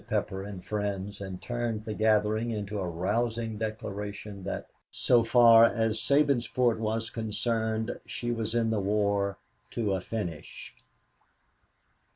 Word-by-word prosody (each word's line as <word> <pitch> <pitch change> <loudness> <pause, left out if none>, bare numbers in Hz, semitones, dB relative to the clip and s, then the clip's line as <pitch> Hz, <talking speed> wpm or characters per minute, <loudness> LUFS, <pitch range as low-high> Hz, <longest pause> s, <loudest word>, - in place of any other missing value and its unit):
Pepper 95 0 -1
and 100 -2 -8
friends 100 -1 -3
and 95 -2 -6
turned 120 -3 -3
the 110 - -3
gathering 110 +1 +2
into 105 -2 -3
a 95 - -2
rousing 110 +5 -1
declaration 105 -2 -5
that, 95 - -4 0.2
so 120 -2 +3
far 115 -1 +7
as 115 -1 +2
Sabinsport 125 -4 +2
was 110 +1 -2
concerned, 110 0 -1
she 120 0 -3
was 115 -1 -2
in 115 -1 +2
the 110 - +1
war 100 0 +1 0.3
to 105 -4 -1
a 95 - -1
finish. 90 -8 -6
110 Hz, 130 wpm, -29 LUFS, 100-115 Hz, 0.3 s, far